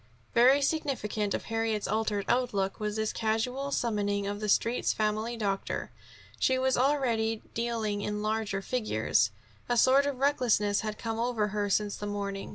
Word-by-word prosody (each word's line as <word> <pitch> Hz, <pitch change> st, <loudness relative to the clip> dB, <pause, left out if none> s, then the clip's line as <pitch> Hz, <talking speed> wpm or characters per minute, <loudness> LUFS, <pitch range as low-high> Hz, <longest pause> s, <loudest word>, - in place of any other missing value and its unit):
Very 260 Hz, +4 st, +5 dB
significant 250 Hz, -9 st, -1 dB
of -, -, -4 dB
Harriet's 225 Hz, -2 st, -1 dB
altered 210 Hz, -1 st, 0 dB
outlook 205 Hz, -6 st, 0 dB
was 210 Hz, -1 st, -2 dB
this 220 Hz, 0 st, -1 dB
casual 250 Hz, +5 st, -1 dB
summoning 205 Hz, -5 st, 0 dB
of 205 Hz, +1 st, -3 dB
the 210 Hz, 0 st, -3 dB
Street's 230 Hz, +4 st, +2 dB
family 215 Hz, +2 st, -1 dB
doctor. 200 Hz, -3 st, -2 dB, 0.5 s
She 260 Hz, -, +3 dB
was 260 Hz, 0 st, +2 dB
already 240 Hz, -5 st, +1 dB
dealing 225 Hz, -3 st, -1 dB
in 210 Hz, 0 st, -3 dB
larger 215 Hz, -2 st, -1 dB
figures. 115 Hz, -, +1 dB, 0.4 s
A 240 Hz, -, +2 dB
sort 270 Hz, +4 st, +5 dB
of 280 Hz, -2 st, -2 dB
recklessness 240 Hz, -7 st, +2 dB
had 215 Hz, -1 st, -4 dB
come 225 Hz, -1 st, -3 dB
over 230 Hz, -3 st, 0 dB
her 205 Hz, 0 st, -1 dB
since 205 Hz, +1 st, 0 dB
the 205 Hz, -, -5 dB
morning. 200 Hz, -1 st, -4 dB
220 Hz, 160 wpm, -29 LUFS, 205-245 Hz, 0.5 s, Very